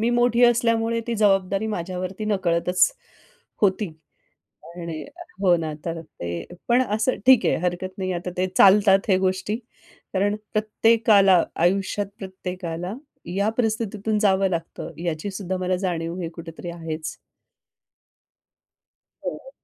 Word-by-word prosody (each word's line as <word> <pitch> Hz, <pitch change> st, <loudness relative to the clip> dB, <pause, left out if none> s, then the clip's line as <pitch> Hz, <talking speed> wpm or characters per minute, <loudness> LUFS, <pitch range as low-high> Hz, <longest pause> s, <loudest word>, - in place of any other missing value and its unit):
मी 230 Hz, +2 st, +2 dB
मोठी 240 Hz, 0 st, +3 dB
असल्यामुळे 230 Hz, -1 st, +2 dB
ती 235 Hz, -, -1 dB
जबाबदारी 195 Hz, 0 st, +2 dB
माझ्यावरती 185 Hz, 0 st, -4 dB
नकळतच 180 Hz, -3 st, +2 dB, 0.7 s
होती 200 Hz, +1 st, +3 dB, 0.9 s
आणि 170 Hz, -3 st, -5 dB, 0.4 s
हो 180 Hz, -3 st, +5 dB
ना, 160 Hz, -2 st, -3 dB
तर 165 Hz, 0 st, -3 dB
ते 85 Hz, -, -6 dB, 0.2 s
पण 245 Hz, +2 st, +4 dB
असं 225 Hz, +4 st, +1 dB
ठीक 255 Hz, -7 st, +7 dB
आहे -, -, +3 dB
हरकत 180 Hz, +1 st, -2 dB
नाही. 185 Hz, -1 st, -2 dB
आता 175 Hz, +1 st, -4 dB
ते 185 Hz, +1 st, +1 dB
चालतात 195 Hz, +1 st, +6 dB
हे 185 Hz, -, +5 dB
गोष्टी 190 Hz, +2 st, 0 dB, 0.6 s
कारण 200 Hz, +2 st, +1 dB, 0.2 s
प्रत्येकाला, 215 Hz, -3 st, +4 dB
आयुष्यात 195 Hz, +3 st, +1 dB
प्रत्येकाला, 180 Hz, -1 st, -5 dB, 0.4 s
या 200 Hz, +2 st, +2 dB
परिस्थितीतून 220 Hz, -2 st, 0 dB
जावं 195 Hz, -2 st, +3 dB
लागतं 165 Hz, -2 st, -4 dB
याची 170 Hz, +3 st, -2 dB
सुद्धा 190 Hz, -1 st, -3 dB
मला 185 Hz, 0 st, 0 dB
जाणीव 170 Hz, -3 st, -2 dB
हे 165 Hz, -, -3 dB
कुठेतरी 165 Hz, +1 st, -9 dB
आहेच. 160 Hz, -1 st, -5 dB, 2.1 s
हो. -, -, -6 dB
190 Hz, 120 wpm, -24 LUFS, 175-215 Hz, 2.1 s, ठीक